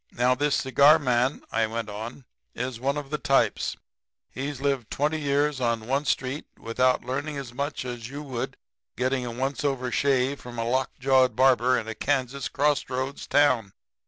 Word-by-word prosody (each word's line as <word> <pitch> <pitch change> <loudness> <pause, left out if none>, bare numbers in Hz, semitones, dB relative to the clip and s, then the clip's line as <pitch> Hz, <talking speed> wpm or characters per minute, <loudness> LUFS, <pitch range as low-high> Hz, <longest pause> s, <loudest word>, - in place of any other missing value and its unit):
"'Now, 125 +1 +2
this 145 +2 +1
cigar 140 +3 +5
man,' 130 -2 +1
I 110 0 +1
went 115 0 -4
on, 110 +5 -7 0.3
'is 125 -1 -4
one 140 +3 0
of 145 -1 -6
the 150 - -1
types. 135 0 +1 0.5
He's 135 +1 -4
lived 135 -5 -1
twenty 155 +2 0
years 145 -1 +1
on 115 -2 0
one 135 +4 0
street 135 +1 -1
without 125 +2 +1
learning 140 +4 -3
as 130 -4 -6
much 140 +1 -3
as 120 -2 -6
you 145 +3 -6
would 130 -5 -4 0.4
in 125 - -1
getting 130 -1 0
a - - -4
once 135 +4 -2
over 130 -3 -1
shave 135 0 +1
from 120 -1 -9
a 115 - -1
lockjawed 130 0 +2
barber 130 0 +4
in 110 - -4
a 110 - -3
Kansas 135 +2 -1
crossroads 140 -2 -1
town. 130 -9 +3
130 Hz, 175 wpm, -26 LUFS, 120-140 Hz, 0.5 s, cigar